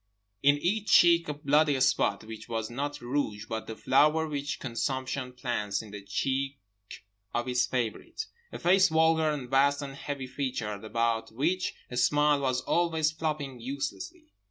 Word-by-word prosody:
In 145 +1 +5
each 205 +6 -1
cheek 170 -2 +6
a - - -1
bloody 145 -1 +2
spot. 130 -3 +2
Which 110 0 -9
was 115 -1 -3
not 145 +3 -4
rouge, 120 -4 -2
but 110 0 -5
the 110 - -5
flower 150 +7 +3
which 145 -1 -3
consumption 130 +1 -3
plants 115 -5 -2
in 105 - -12
the 105 -1 -7
cheek 135 +7 -1 0.8
of 120 +1 -1
its 125 0 +1
favourite. 130 - -3 0.3
A - - -6
face 190 +2 +4
vulgar 160 0 +3
and 145 -4 -3
vast 140 +2 +3
and 135 -1 -6
heavy 140 -1 -5
featured, 125 -6 -4
about 115 +1 -1
which 165 +11 -1 0.2
a 125 - -4
smile 145 +3 +3
was 130 -2 0
always 160 -2 +1
flopping 150 -5 -3
uselessly. 140 - -5
135 Hz, 155 wpm, -29 LUFS, 120-155 Hz, 0.8 s, cheek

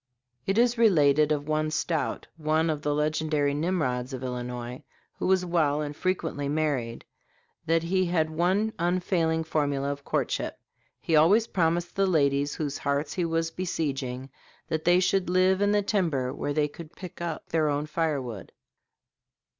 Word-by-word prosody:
It 195 - +1
is 240 0 +3
related 150 -8 +4
of 145 -1 -1
one 155 0 0
Stout, 155 0 -1
one 160 0 +1
of 150 -1 -3
the 145 -1 0
legendary 150 -1 0
Nimrods 145 -6 -1
of 130 0 -5
Illinois, 125 -1 -5 0.4
who - - -1
was 185 -1 +3
well 155 -4 +1
and 145 -1 -4
frequently 160 -5 -2
married, 145 -6 -1 0.6
that 165 0 +2
he 185 +2 +1
had 160 -2 +1
one 190 +7 +1
unfailing 170 -2 +1
formula 145 -3 0
of 145 0 -6
courtship. - - -2 0.4
He 160 - 0
always 190 +9 +5
promised 175 -3 0
the 195 0 +2
ladies 140 -4 +2
whose 145 -2 -3
hearts 140 +1 -1
he 180 -2 -1
was 165 0 -1
besieging 135 -7 -3 0.4
that 160 -1 -2
"they 175 +1 +5
should 185 0 +1
live 185 +1 +3
in 205 0 +3
the 205 0 +2
timber 160 - 0
where 145 - -3
they 150 0 +2
could 155 +2 -11
pick 180 -3 -9
up 170 -2 -4
their 155 -2 +2
own 145 +1 -1
firewood." 145 - -3
155 Hz, 160 wpm, -27 LUFS, 145-175 Hz, 0.6 s, always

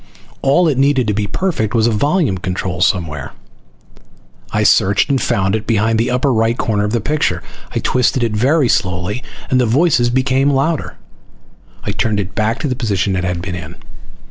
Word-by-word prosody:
All 155 +6 +3
it 140 -4 +1
needed 135 -2 +3
to 105 - 0
be 105 0 -1
perfect 120 - -1
was 110 -1 +3
a 120 - +2
volume 140 - +1
control 90 -1 -3
somewhere. 80 -7 -1 1.2
I - - +1
searched, 100 +8 +3
and 135 - +1
found 95 -4 +1
it 110 - -4
behind 110 0 +1
the 115 - +1
upper 125 +2 +1
right 115 +1 +1
corner 105 -2 0
of 105 - -1
the 120 - +1
picture. 150 +7 -1 0.3
I - - -5
twisted 125 0 +1
it 115 - 0
very 135 +5 +2
slowly, 90 +4 -1 0.3
and 130 -1 +3
the 120 - +1
voices 125 -1 +3
became 130 +2 +1
louder. 145 +3 -1 0.9
I - - -2
turned 110 -2 -1
it 95 -1 -4
back 110 +2 0
to 150 - -1
the 130 - -1
position 100 -5 -1
it 90 - -1
had 90 -2 -2
been 95 -1 -4
in. 85 -1 -7
115 Hz, 190 wpm, -17 LUFS, 100-135 Hz, 1.2 s, All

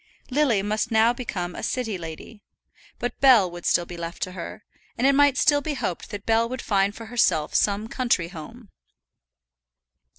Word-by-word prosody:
Lily 250 -8 +2
must 215 +2 -1
now 225 +1 +4
become 185 -8 -4
a - - -7
city 235 -5 -2
lady; 170 +5 -9 0.6
but 245 - -4
Bell 235 -10 +6
would 175 0 -6
still 175 - +2
be 175 0 -9
left 170 0 -5
to 185 - -4
her, 185 +3 -8 0.3
and 245 - 0
it 275 - +5
might 285 -1 +4
still 290 -1 +4
be 295 0 -3
hoped 180 -9 -4
that 205 -2 -7
Bell 230 +1 +2
would 255 +1 -5
find 200 0 +1
for 230 - -9
herself 185 -10 +1
some 205 +1 +1
country 235 -9 0
home. 205 +7 -11
220 Hz, 175 wpm, -24 LUFS, 180-245 Hz, 0.6 s, Bell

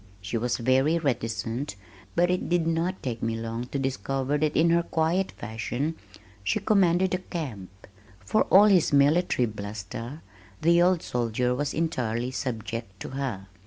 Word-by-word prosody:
She 100 +4 -5
was 120 +1 0
very 130 +6 +3
reticent, 120 -3 -2 0.4
but 175 +1 +3
it 180 - -1
did 175 -1 +2
not 165 +3 -1
take 120 -3 -3
me 115 0 -1
long 115 +2 -4
to 140 - -3
discover 135 +2 -1
that 155 0 +1
in 165 +1 +4
her 170 0 +4
quiet 170 +3 0
fashion 120 +7 -3 0.5
she 95 - +1
commanded 185 -3 +3
the 185 - 0
camp. 135 - -6 0.6
For 215 - +2
all 200 +2 +7
his 190 -6 +4
military 145 -1 +3
bluster, 110 +5 -6 0.4
the 170 +1 +4
old 180 -1 +3
soldier 120 +1 0
was 145 +3 -2
entirely 125 -7 -1
subject 115 -5 -4
to - - -5
her. 130 -8 -4
135 Hz, 155 wpm, -27 LUFS, 115-165 Hz, 0.6 s, all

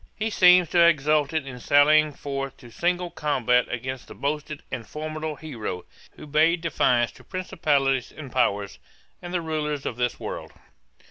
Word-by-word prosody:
He 220 +1 -2
seems 180 -2 +6
to 175 - +2
have 170 0 +8
exulted 150 -1 +1
in 125 -2 -8
sallying 150 +3 +4
forth 135 -1 -5
to 120 -2 -14
single 175 +4 -1
combat 125 -5 +1
against 125 +1 -5
the - - -11
boasted 150 +1 -3
and 120 -3 -5
formidable 155 0 -5
hero, 115 - -6 0.3
who - - -11
bade 160 +3 +2
defiance 120 -8 +2
to - - -17
'principalities 140 -8 0
and 140 -5 -10
powers, 100 -6 0 0.4
and 175 - -7
the 180 -1 -1
rulers 150 -3 -3
of 115 - -3
this 125 0 -1
world.' - - -6
150 Hz, 160 wpm, -25 LUFS, 130-160 Hz, 0.4 s, have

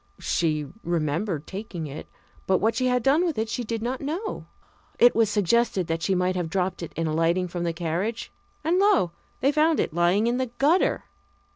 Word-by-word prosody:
She 155 -3 0 0.2
remembered 165 0 -1
taking 190 -4 -6
it, 145 +1 -8 0.4
but 190 - +4
what 225 +4 +1
she 255 +3 0
had 250 -1 +1
done 285 +7 +4
with 335 -4 -1
it 220 +1 0
she 245 +2 -2
did 225 0 -3
not 255 +2 -2
know. 335 +10 -4 0.5
It 240 - +6
was 225 -2 +3
suggested 205 -1 +2
that 165 0 -2
she 190 +2 +1
might 180 +1 +1
have 175 -3 -2
dropped 185 0 -1
it 170 - -6
in 165 - -2
alighting 165 +3 +1
from 175 0 -4
the 170 - 0
carriage. 175 +7 -3 0.3
And 345 +3 +2
lo! 390 - +3 0.3
they 275 - +3
found 310 +2 +3
it - - -1
lying 175 +5 +2
in 240 +1 +1
the 260 0 -1
gutter. 320 +7 +2
195 Hz, 195 wpm, -25 LUFS, 170-250 Hz, 0.5 s, It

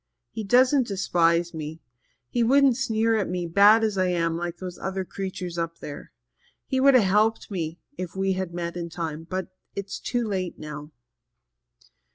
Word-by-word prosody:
He 220 - -5
doesn't 255 +4 +4
despise 175 -3 +1
me 160 0 -6 0.5
he 240 - -1
wouldn't 270 +2 +5
sneer 225 -3 +1
at 205 - -1
me, 180 -1 -2
bad 205 +6 +6
as 210 -3 0
I 185 - +3
am, 165 -2 0
like 175 0 -4
those 180 -1 -7 0.3
creatures 185 -3 -4
up 165 0 -3
there. 145 -1 -9 0.5
He 265 - -1
could 275 0 +6
have 245 - +6
helped 210 +3 +2
me 165 -3 -3 0.2
if 180 -1 -5
we 190 0 +1
had 185 -2 -3
met 170 0 -4
in 170 -1 -4
time, 165 -1 -5
but 185 0 -3 0.3
it's 200 0 -5
too 240 -2 -1
late 185 -3 -3
now." 150 -1 -8
185 Hz, 170 wpm, -25 LUFS, 170-220 Hz, 0.5 s, bad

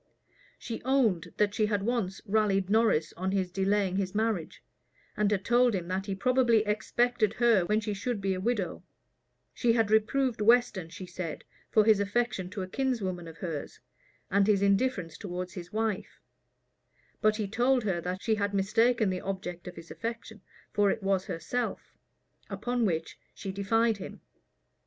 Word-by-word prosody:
She 230 - -6
owned 245 -10 +1
that 205 -1 +2
she 215 0 +1
had 205 -2 0
once 215 -5 -1
rallied 200 -2 +1
Norris 220 -8 +3
on 190 +2 -1
his 190 -2 0
delaying 195 0 +1
his 195 0 -2
marriage, 215 -6 -1 0.5
and 210 -1 +2
had 200 -2 -1
told 240 -1 +4
him 175 -2 -3
that 190 +2 -2
he 195 - -2
probably 235 +1 +3
expected 215 +1 +1
her 230 -7 +4
when 210 +3 +1
she 210 -1 -3
should 210 +3 -3
be 195 -1 0
a 185 - -3
widow: 215 -3 -1 0.7
she 235 -2 +2
had 225 -2 +2
reproved 225 +2 +2
Weston, 220 -6 +3
she 185 - -8
said, 175 -3 -6 0.3
for 215 -1 +4
his 215 -2 +5
affection 200 -2 -1
to 190 0 -4
a - - -5
kinswoman 195 -8 -2
of 165 0 -11
hers, 160 -5 -5 0.5
and 200 +1 +3
his 200 -2 +3
indifference 200 -5 +1
towards 180 -2 -5
his 175 -1 -8
wife; 215 -2 -2 1.0
but 215 0 +4
he 215 -2 -2
told 245 +4 +2
her 190 -5 -1
that 180 +2 -4
she 225 - +2
had 205 -1 -1
mistaken 220 +2 +2
the 185 - -3
object 185 -2 -5
of 180 - -7
his 165 0 -11
affection, 230 -2 -6 0.3
for 205 -1 +3
it 195 - -2
was 195 0 +1
herself; 205 +7 -3 0.5
upon 245 -1 -1
which 165 -4 -2 0.2
she 195 - -5
defied 220 +3 +1
him. 195 - -8
205 Hz, 170 wpm, -29 LUFS, 190-225 Hz, 1.0 s, his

